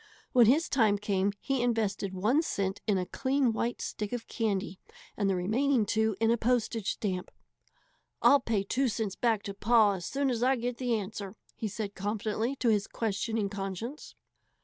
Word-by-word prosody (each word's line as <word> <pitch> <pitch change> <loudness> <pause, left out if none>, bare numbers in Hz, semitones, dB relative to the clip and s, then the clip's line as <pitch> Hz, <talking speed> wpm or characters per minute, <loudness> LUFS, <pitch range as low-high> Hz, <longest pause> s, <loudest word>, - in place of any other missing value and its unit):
When 240 -3 +6
his 300 +8 +4
time 220 -6 +3
came 200 -1 0
he 270 -3 -1
invested 215 -5 0
one 215 +11 +2
cent 195 - -2
in 205 -3 +3
a 180 - -1
clean 260 +2 +1
white 235 +2 -2
stick 210 -1 -4
of 240 -2 -4
candy 200 -5 -2 0.4
and 200 -2 0
the 190 - +2
remaining 230 +6 +1
two 220 0 +1
in 225 0 +3
a 235 - +3
postage 230 -3 0
stamp. 185 -4 -3 0.9
"I'll 285 - +6
pay 225 -6 -1
two 260 +7 0
cents 215 -4 -2
back 225 -3 +1
to 200 - -5
pa 215 +1 +4
as 185 -2 -4
soon 275 -1 0
as 235 -2 -2
I 260 +2 +4
get 245 0 -3
the 245 -3 0
answer," 200 0 -6 0.2
he 220 - -3
said 205 0 -4
confidently 215 +5 -2
to 250 -3 +1
his 210 -2 +2
questioning 220 0 -1
conscience. 200 - -6
220 Hz, 180 wpm, -30 LUFS, 200-245 Hz, 0.9 s, When